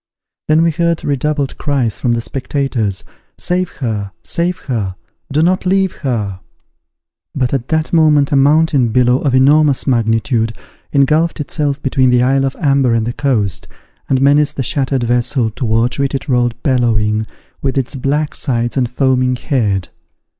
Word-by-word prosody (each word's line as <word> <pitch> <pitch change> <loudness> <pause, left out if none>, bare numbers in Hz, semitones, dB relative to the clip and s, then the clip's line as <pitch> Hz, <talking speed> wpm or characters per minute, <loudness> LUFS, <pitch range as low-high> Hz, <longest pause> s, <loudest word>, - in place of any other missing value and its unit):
Then 155 +1 +4
were 165 - +3
heard 170 +1 -1
redoubled 145 0 -1
cries 135 -7 -1
from 120 - +1
the 115 - -1
spectators, 125 -6 -2 0.3
"Save 180 0 -1
her! 105 -4 -2
save 175 +1 0
her! 105 -9 -3 0.4
do 150 +3 +2
not 185 +2 +1
leave 190 0 +1
her!" 105 -9 -3 1.0
But 130 -2 -1
at 130 -2 -2
that 160 +1 -1
moment 150 -3 +4
a - - +2
mountain 145 -1 +3
billow, 125 +2 +2
of 135 -4 0
enormous 140 +1 +4
magnitude, 115 -1 +1 0.4
ingulfed 155 +4 +2
itself 145 -1 -2
between 130 -1 +2
the 125 0 +3
isle 135 +1 +2
of 135 - -2
Amber 135 -6 +2
and 115 -1 0
the 120 - -3
coast, 115 -9 -1 0.4
and 130 - +2
menaced 145 +2 +3
the 135 - -2
shattered 135 0 -1
vessel, 120 0 0
towards 115 +2 0
which 140 0 0
it 135 - -4
rolled 120 -3 0
bellowing, 110 -5 +1 0.3
with 135 0 -2
its 135 0 -1
black 145 +3 -1
sides 120 -4 -1
and 125 -3 +1
foaming 130 0 +1
head. 105 - -1
135 Hz, 155 wpm, -16 LUFS, 120-145 Hz, 1.0 s, Then